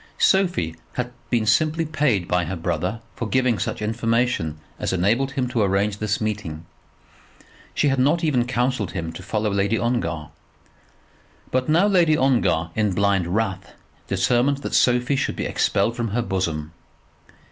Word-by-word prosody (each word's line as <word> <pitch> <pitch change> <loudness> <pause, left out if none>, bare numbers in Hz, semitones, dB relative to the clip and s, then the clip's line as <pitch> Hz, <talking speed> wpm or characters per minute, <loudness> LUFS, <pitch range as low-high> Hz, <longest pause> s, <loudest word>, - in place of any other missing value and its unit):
Sophie 175 - +2 0.2
had 125 0 -3 0.2
been 115 -3 +1
simply 155 +9 +2
paid 145 - 0
by 90 -1 +1
her 95 - -4
brother 90 +5 -2
for 115 - -4
giving 130 -4 +2
such - - -3
information 115 -7 0 0.2
as - - -1
enabled 110 +10 +1
him 130 -3 -1
to 120 -2 -1
arrange 100 +1 +1
this 105 -1 -1
meeting. 100 -7 -4 1.1
She 145 - +2
had 135 -1 +1
not 150 +6 +2
even 130 -6 +1
counselled 125 -6 -1
him 80 -3 -4
to 95 - -8
follow 105 +2 -1
Lady 100 +3 +1
Ongar. 85 -11 -2 1.2
But 130 +2 0
now 170 +5 +4
Lady 175 -6 +4
Ongar, 120 - +2
in 105 -3 +1
blind 100 -3 +2
wrath, 95 0 -2 0.3
determined 125 +9 +1
that - - -4
Sophie 125 +2 +3
should - - -1
be - - -3
expelled 105 +4 +1
from 120 -1 -2
her 115 +3 -1
bosom. 85 -7 -2
110 Hz, 155 wpm, -23 LUFS, 95-130 Hz, 1.2 s, now